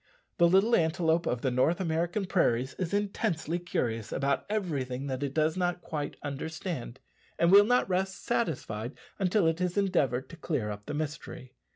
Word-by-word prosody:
The 170 - +7
little 195 +6 +5
antelope 165 0 +2
of 120 -1 -1
the 130 - +1
North 130 +7 +2
American 170 +3 0
prairies 130 -9 +1
is 180 -3 -2
intensely 195 -5 -1
curious 115 -10 -2
about 140 0 0
everything 140 -11 -2
that 130 -1 -3
it 140 -2 -1
does 155 0 +2
not 180 -1 -1
quite 150 -3 -4
understand, 145 -2 -5 0.4
and 170 +1 +4
will 200 +1 +9
not 245 +3 +3
rest 190 0 -2
satisfied 130 - -2 0.2
until 190 0 +2
it 165 +1 +1
has 180 +1 -1
endeavoured 140 -10 +1
to 170 - -10
clear 130 -12 -2
up 105 0 -8
the 150 - -3
mystery. 150 -4 -5
160 Hz, 170 wpm, -29 LUFS, 135-185 Hz, 0.4 s, will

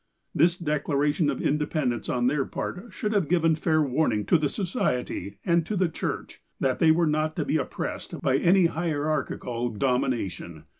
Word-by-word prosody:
This 175 +1 +3
declaration 150 -1 0
of 135 - -2
independence 150 -4 -1
on 120 -1 0
their 135 +2 +2
part 180 - -5
should 210 0 -2
have 195 -8 +1
given 165 -2 +3
fair 155 0 +2
warning 125 -6 0
to 165 - +4
the 145 -2 0
Society, 130 - -2
and 170 -2 +3
to 215 - -2
the 185 -2 +2
Church, - - -5 0.2
that 130 -2 0
they 160 - +5
were 165 +2 +4
not 155 0 0
to 155 - -1
be 155 - +1
oppressed 135 - -4
by 130 0 +2
any 180 +4 +4
hierarchical 150 -7 -1
dom 125 +3 +1
ination. 90 -9 -4
150 Hz, 170 wpm, -26 LUFS, 130-170 Hz, 0.2 s, they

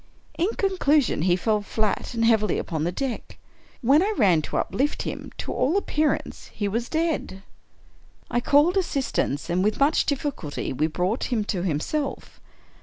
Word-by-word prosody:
In 345 +5 +1
conclusion, 310 - +2
he 175 +1 +3
fell 210 +3 +1
flat 215 +2 -2
and 230 0 +2
heavily 215 -4 +3
upon 160 -2 -2
the 175 - 0
deck. 255 +5 -4 0.5
When 275 +6 +5
I 405 +3 +1
ran 185 - +4
to - - -4
uplift 290 +3 -1
him, - - -6
to - - -4
all 310 +9 +1
appearance 310 -6 -1
he 205 - -2
was 230 +4 -2
dead. 315 - -2 0.8
I 240 - 0
called 295 +9 +4
assistance, 270 - -1
and, 180 +1 +1
with 210 +1 0
much 285 +3 +3
difficulty, 275 - -3
we 150 +4 +1
brought 180 +8 -1
him 230 -5 0
to 195 -3 -2
himself. 190 - -3
230 Hz, 160 wpm, -25 LUFS, 185-295 Hz, 0.8 s, When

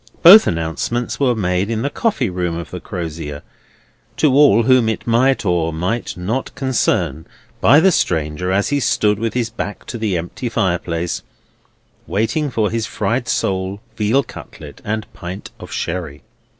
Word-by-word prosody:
Both 195 +6 +10
announcements 85 +9 -2
were 130 -4 +2
made 95 -1 0
in 115 0 -1
the 140 - -1
coffee 135 - 0
room 90 -2 -2
of 85 -5 -7
the - - -5
Crozier, 80 -4 -6 0.7
to 150 -4 +3
all 135 -6 +6
whom 125 -2 +4
it 110 - -3
might 120 +1 +2
or 85 -3 +1
might 90 +10 -3
not 110 +9 -3
concern, 95 - 0 0.3
by 140 +6 +6
the 190 +3 +5
stranger 80 - 0
as 100 +2 +1
he 145 - +1
stood 105 -5 +1
with 115 +1 -2
his 120 -2 -1
back 105 -2 -5
to 120 - -6
the 105 -5 0
empty 90 +9 -4
fireplace, 90 -5 -1 0.9
waiting 130 +9 0
for 110 -4 0
his 115 -1 -1
fried 120 +2 -1
sole, 95 +1 -1 0.2
veal 115 +6 +2
cutlet, - - -11
and 110 0 -2
pint 90 +2 -8
of - - -10
sherry. 80 -5 -4
105 Hz, 160 wpm, -19 LUFS, 90-120 Hz, 0.9 s, Both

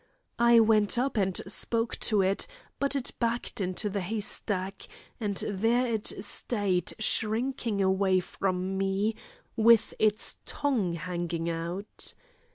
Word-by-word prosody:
I 235 0 +6
went 220 0 +4
up 260 +2 0
and 190 -3 +1
spoke 225 +4 +1
to 210 -3 +3
it, 190 +1 +1 0.3
but 280 0 +1
it 270 -3 0
backed 235 -2 -1
into 185 +3 0
the 200 -1 -2
hay 215 +5 -3
stack, 195 -3 -2 0.3
and 205 -4 -2
there 225 +5 +1
it 225 -3 0
stayed 195 -8 0
shrinking 225 0 0
away 190 0 +2
from 185 +1 -2
me, 195 +3 0 0.4
with 230 0 +4
its 215 -1 +1
tongue 240 -12 -1
hanging 170 -1 -3
out. 170 +5 -4
205 Hz, 130 wpm, -28 LUFS, 190-230 Hz, 0.4 s, I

